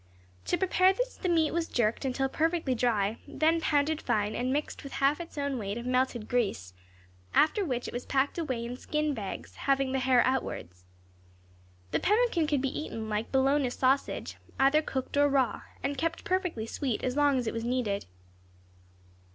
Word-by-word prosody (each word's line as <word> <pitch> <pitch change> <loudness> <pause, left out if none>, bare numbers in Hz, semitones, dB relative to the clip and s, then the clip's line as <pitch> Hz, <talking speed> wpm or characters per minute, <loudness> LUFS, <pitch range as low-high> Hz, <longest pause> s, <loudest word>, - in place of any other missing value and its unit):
To - - +1
prepare 375 0 +4
this - - -2
the 370 - -2
meat 325 -3 +3
was 335 0 -1
jerked 235 +2 0
until 270 +1 0
perfectly 320 -1 0
dry, 225 -3 +1
then 320 +3 +2
pounded 300 0 +1
fine, 210 0 0
and 250 +1 -1
mixed 295 +2 -2
with 275 - -8
half 280 +4 +2
its 335 -2 -10
own 280 -3 -1
weight 200 0 -3
of 235 - -6
melted 250 -3 0
grease; 195 - -1 0.6
after 395 +7 +4
which 250 -8 -2
it - - -7
was 245 +1 -5
packed 275 +4 +1
away 255 -8 -2
in 245 +1 -5
skin 300 +2 -1
bags, 210 -6 -6
having 275 -1 +1
the 265 - +1
hair 255 -1 +4
outwards. 90 - -3 1.1
The - - +1
pemmican 420 -6 +2
could 285 -3 +1
be 270 - -1
eaten, 220 -7 -5
like 210 +1 -2
bologna 270 0 +3
sausage, 265 +2 0 0.2
either 275 +3 +5
cooked 270 -2 -4
or 290 0 +5
raw, 270 -3 +1 0.2
and 275 -1 -2
kept 330 +3 -2
perfectly 365 - -1
sweet 245 0 -3
as 250 0 -1
long 290 -2 +3
as 250 - -1
it 220 - -2
was 230 - -3
needed. 235 -5 -1
270 Hz, 180 wpm, -29 LUFS, 240-305 Hz, 1.1 s, either